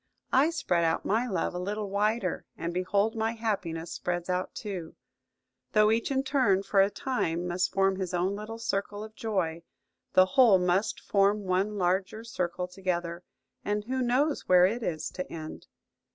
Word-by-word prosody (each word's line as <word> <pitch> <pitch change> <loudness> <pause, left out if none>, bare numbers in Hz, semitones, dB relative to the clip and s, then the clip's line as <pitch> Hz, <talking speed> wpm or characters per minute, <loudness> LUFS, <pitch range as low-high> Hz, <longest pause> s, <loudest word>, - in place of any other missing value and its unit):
I 275 +4 +5
spread 275 - 0
out 165 0 0
my 230 +4 +1
love 195 - -1
a 180 - -3
little 205 +3 -3
wider, 205 -1 -1
and 170 +1 -3
behold 200 +5 +1
my 225 0 0
happiness 185 -8 -3
spreads 175 0 -3
out 180 0 -2
too! 185 -7 -6 0.8
Though 215 -1 +5
each 225 +1 +1
in 270 -1 +1
turn, 255 -9 +2
for 195 -1 +3
a 195 - +4
time, 180 -7 -2
must 180 +1 0
form 195 -1 +2
his 185 -2 -3
own 180 +2 0
little 215 +2 -6
circle 205 -1 -3
of 215 0 -10
joy, 190 -8 -2 0.5
the 185 - +7
whole 230 -1 +6
must 180 +3 +1
form 200 +1 +2
one 195 +3 0
larger 190 +4 0
circle 180 -5 -3
together; 180 -2 -3 0.4
and 210 0 -1
who 260 +4 -2
knows 265 +5 +1
where 180 -1 +7
it 225 +6 0
is 160 -7 -2
to 180 - -6
end?" 155 -1 -8
195 Hz, 170 wpm, -28 LUFS, 180-220 Hz, 0.8 s, the